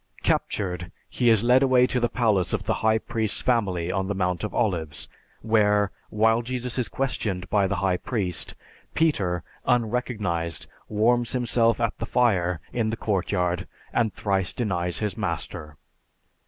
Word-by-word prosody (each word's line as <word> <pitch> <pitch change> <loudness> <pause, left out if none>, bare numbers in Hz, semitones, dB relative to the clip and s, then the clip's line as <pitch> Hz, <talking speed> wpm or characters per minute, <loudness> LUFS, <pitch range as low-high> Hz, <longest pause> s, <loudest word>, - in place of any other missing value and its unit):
Captured, 90 -3 -1 0.2
he 120 -2 +2
is 110 -2 +4
led 125 +2 +5
away 130 -2 +5
to 125 - 0
the 120 -1 +1
palace 105 -7 +1
of - - -1
the - - 0
high 110 0 +4
priest's 110 -1 0
family 95 -9 +1
on 95 0 -1
the 100 - -2
Mount 90 -1 -1
of 105 - -2
Olives, 80 -10 -1 0.4
where, 105 -2 +3 0.2
while 110 +2 +3
Jesus 125 +1 -3
is 125 - -1
questioned 105 -9 -2
by 100 -2 +3
the - - -1
high 95 -1 +1
priest, 95 -5 -2 0.4
Peter, 95 - +1 0.2
unrecognized, 110 -9 -1 0.2
warms 120 +3 +2
himself 120 -2 +2
at 115 -2 0
the 115 - -3
fire 90 -10 +2
in 115 -2 0
the 115 - -3
courtyard 90 -4 -1 0.3
and 115 -3 +2
thrice 95 -3 0
denies 90 -7 -2
his 105 -3 -2
master. 75 -2 -4
105 Hz, 155 wpm, -25 LUFS, 90-120 Hz, 0.4 s, led